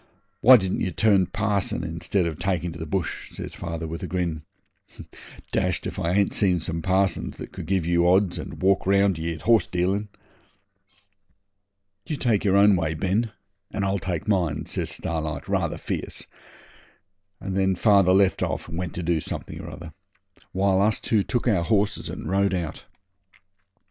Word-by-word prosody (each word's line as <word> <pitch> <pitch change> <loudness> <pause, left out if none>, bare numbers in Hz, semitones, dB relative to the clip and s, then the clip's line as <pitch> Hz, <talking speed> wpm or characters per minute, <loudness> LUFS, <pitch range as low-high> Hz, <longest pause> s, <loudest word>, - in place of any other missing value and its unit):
Why 125 +4 +9
didn't 95 -3 -2
ye - - 0
turn 100 0 +3
parson 100 -3 -1
instead 85 +3 -1
of 80 -1 -4
taking 90 -2 -1
to 80 - -9
the 80 - -5
bush?' 90 0 -3
says - - -7
father, 80 -1 -5
with 80 +1 -6
a - - -4
grin. 85 -4 -2 1.1
'Dashed - - 0
if - - -4
I 85 +2 0
ain't 100 0 +2
seen 90 -3 +2
some 80 +1 -4
parsons 95 0 0
that - - -8
could - - -8
give 95 -3 +1
you 85 0 +3
odds 95 0 +3
and - - -7
walk 95 -1 +3
round 100 -3 +3
ye 85 +1 -2
at 80 - -12
horse 110 -5 +4
dealin'.' 95 +4 -1 2.0
'You 155 - -2
take 120 -7 +1
your 100 -1 +3
own 100 0 +6
way, 80 -3 -1
Ben, 100 +6 0 0.4
and 100 -2 -2
I'll 95 0 0
take 85 -3 -4
mine,' 90 -8 0
says - - -3
Starlight 80 -3 -3
rather - - 0
fierce, - - -4 1.1
and 95 -1 -4
then 95 -1 +2
father 100 -2 +4
left 95 0 +3
off - - -2
and 85 +1 -5
went 90 -1 -4
to 90 - -3
do 85 -1 +1
something - - -5
or - - -8
other, - - -10 0.6
while 95 0 +2
us 105 +2 +2
two 110 -3 +1
took 120 +4 -2
our 95 -7 +3
horses 100 0 0
and - - -6
rode 100 0 +1
out. 85 -4 -4
95 Hz, 175 wpm, -25 LUFS, 85-100 Hz, 2.0 s, Why